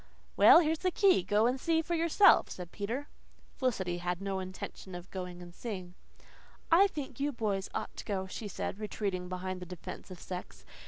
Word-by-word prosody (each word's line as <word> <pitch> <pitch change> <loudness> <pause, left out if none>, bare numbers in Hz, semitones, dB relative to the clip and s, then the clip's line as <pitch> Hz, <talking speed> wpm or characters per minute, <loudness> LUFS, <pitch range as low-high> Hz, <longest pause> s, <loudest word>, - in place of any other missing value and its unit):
"Well, 335 - +9
here's 320 -1 0
the 370 - +1
key 375 - +4
go 205 +4 +2
and 250 +2 +1
see 325 -1 +2
for 345 - -3
yourself," 335 +4 +5
said 180 -2 -7
Peter. 235 +8 -3 0.5
Felicity 190 -10 -1
had 175 0 -2
no 195 -1 -2
intention 185 0 -7
of 175 +1 -9
going 180 -2 -6
and 175 0 -12
seeing. 185 -5 -6 0.8
"I 375 +5 +7
think 290 -7 -7
you 285 +1 +1
boys 205 -6 -2
ought - - -4
to - - -7
go," 190 -2 -2
she 205 +3 -6
said, 200 0 -4
retreating 195 -4 -3
behind 185 0 -4
the 180 - -8
defence 180 +2 -8
of 185 -2 -9
sex. 180 -1 -7
195 Hz, 190 wpm, -32 LUFS, 180-280 Hz, 0.8 s, Well